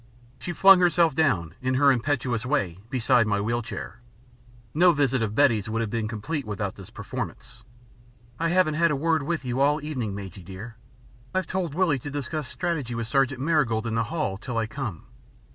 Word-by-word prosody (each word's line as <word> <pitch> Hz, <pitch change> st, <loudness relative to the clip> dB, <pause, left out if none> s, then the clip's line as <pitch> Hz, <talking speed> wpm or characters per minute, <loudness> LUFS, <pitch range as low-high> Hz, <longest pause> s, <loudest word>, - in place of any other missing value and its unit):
She 175 Hz, -, -4 dB
flung 195 Hz, +1 st, +7 dB
herself 170 Hz, -3 st, +3 dB
down, 105 Hz, -, +1 dB
in 130 Hz, 0 st, 0 dB
her 140 Hz, +1 st, +5 dB
impetuous 125 Hz, -3 st, 0 dB
way, 100 Hz, -, -1 dB
beside 120 Hz, -2 st, +3 dB
my 100 Hz, -1 st, +1 dB
wheel 115 Hz, +3 st, -1 dB
chair. 115 Hz, -, -7 dB, 0.7 s
No 175 Hz, +3 st, +5 dB
visit 135 Hz, -4 st, +1 dB
of 110 Hz, -1 st, -2 dB
Betty's 115 Hz, -7 st, +3 dB
would 110 Hz, +1 st, -1 dB
have 110 Hz, -3 st, -3 dB
been 115 Hz, -2 st, -1 dB
complete 125 Hz, +8 st, -3 dB
without 105 Hz, -3 st, -3 dB
this 95 Hz, -, -12 dB
performance. -, -, -7 dB, 0.8 s
"I 165 Hz, +1 st, +1 dB
haven't 175 Hz, -3 st, +3 dB
had 170 Hz, -, +5 dB
a 150 Hz, -, +1 dB
word 160 Hz, +2 st, +1 dB
with 145 Hz, -1 st, -3 dB
you 125 Hz, +2 st, -1 dB
all 145 Hz, +2 st, +4 dB
the 150 Hz, -1 st, -7 dB
evening, 120 Hz, -10 st, -3 dB
Majy, 95 Hz, -2 st, -8 dB
dear. 95 Hz, +6 st, -9 dB, 0.6 s
I've 185 Hz, -, +1 dB
told 180 Hz, -6 st, -3 dB
Willie 165 Hz, -7 st, +2 dB
to 145 Hz, -, -7 dB
discuss 145 Hz, 0 st, -4 dB
strategy 150 Hz, -7 st, -3 dB
with 115 Hz, 0 st, -2 dB
Sergeant 135 Hz, +1 st, +1 dB
Marigold 135 Hz, -8 st, +1 dB
in 115 Hz, -, -2 dB
the 115 Hz, 0 st, +1 dB
hall, 150 Hz, -10 st, -2 dB
till 120 Hz, +2 st, -5 dB
I 115 Hz, -, +1 dB
come. 110 Hz, -, -6 dB
130 Hz, 195 wpm, -26 LUFS, 110-155 Hz, 0.8 s, flung